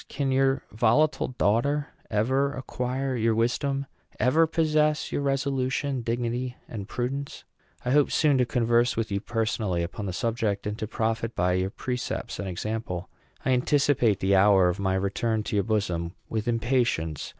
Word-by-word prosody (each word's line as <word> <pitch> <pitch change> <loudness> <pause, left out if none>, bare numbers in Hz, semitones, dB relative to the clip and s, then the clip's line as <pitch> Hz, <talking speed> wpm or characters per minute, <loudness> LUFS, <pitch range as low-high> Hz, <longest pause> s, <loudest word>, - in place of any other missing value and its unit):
can 135 -1 -1
your 135 0 +2
volatile 120 +8 +2
daughter 130 +5 +1 0.2
ever 130 +6 +1
acquire 130 0 -3
your 115 -1 +1
wisdom 135 +4 0 0.3
ever 160 +6 +4
possess 155 -2 +1
your - - -1
resolution, 135 -1 0
dignity, 120 +2 -2
and 100 -4 -6
prudence? 135 +4 -4 0.4
I 125 - +1
hope 145 +1 +4
soon 145 -4 +3
to 125 - +4
converse 120 0 +2
with 115 -2 -1
you 100 - 0
personally 110 -5 -1
upon 100 +4 -5
the 95 - -3
subject, 110 -2 -1
and 105 0 -2
to 110 - -3
profit 115 0 -2
by 90 +1 +2
your 95 +1 0
precepts 125 +4 -4
and 100 - -3
example. 95 -1 -4 0.4
I 130 - +2
anticipate 125 -5 +2
the 95 +1 +3
hour 95 -2 +5
of 90 +3 -3
my 95 -1 +1
return 105 +3 0
to 105 - -3
your 100 - +2
bosom 90 -6 -1
with 110 +1 -2
impatience. 115 - 0
120 Hz, 160 wpm, -26 LUFS, 105-135 Hz, 0.4 s, hour